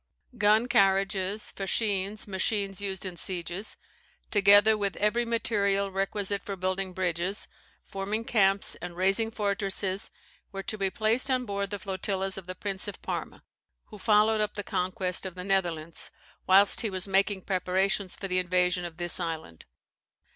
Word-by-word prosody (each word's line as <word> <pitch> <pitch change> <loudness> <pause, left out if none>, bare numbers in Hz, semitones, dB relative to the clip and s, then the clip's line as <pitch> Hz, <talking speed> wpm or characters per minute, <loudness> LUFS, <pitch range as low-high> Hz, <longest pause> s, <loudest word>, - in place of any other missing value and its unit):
Gun 215 +2 +3
carriages, 195 -1 +1
fascines, 200 +1 -1
machines 200 0 -1
used 195 -1 -3
in 180 -2 -5
sieges, 180 +3 -4 0.5
together 205 +1 +6
with 200 -2 -2
every 225 +4 +1
material 200 -4 0
requisite 195 +1 -2
for 200 - -5
building 185 0 -2
bridges, 180 +2 -1 0.4
forming 205 +4 -3
camps, 195 -4 +3
and 175 -1 -7
raising 195 +5 +2
fortresses, 200 -2 -1 0.4
were 195 0 -5
to 215 - -2
be 195 -2 0
placed 225 +6 +3
on 255 -1 +1
board 200 -2 -2
the 205 - -3
flotillas 190 0 -2
of 190 -2 -8
the 185 - -5
Prince 195 +1 -3
of 205 - -6
Parma, - - -5 0.5
who 210 - -11
followed 215 +1 +3
up 210 0 -1
the 205 - -3
conquest 180 0 -1
of 190 -2 -6
the 180 - -6
Netherlands, 175 -4 -1 0.4
whilst 195 +2 +6
he 225 - -1
was 185 -1 -1
making 195 0 +2
preparations 190 +1 0
for 195 - -5
the 185 -1 +1
invasion 180 0 +1
of 165 -2 -8
this 175 +1 0
island. 160 - -5
195 Hz, 155 wpm, -28 LUFS, 185-205 Hz, 0.5 s, together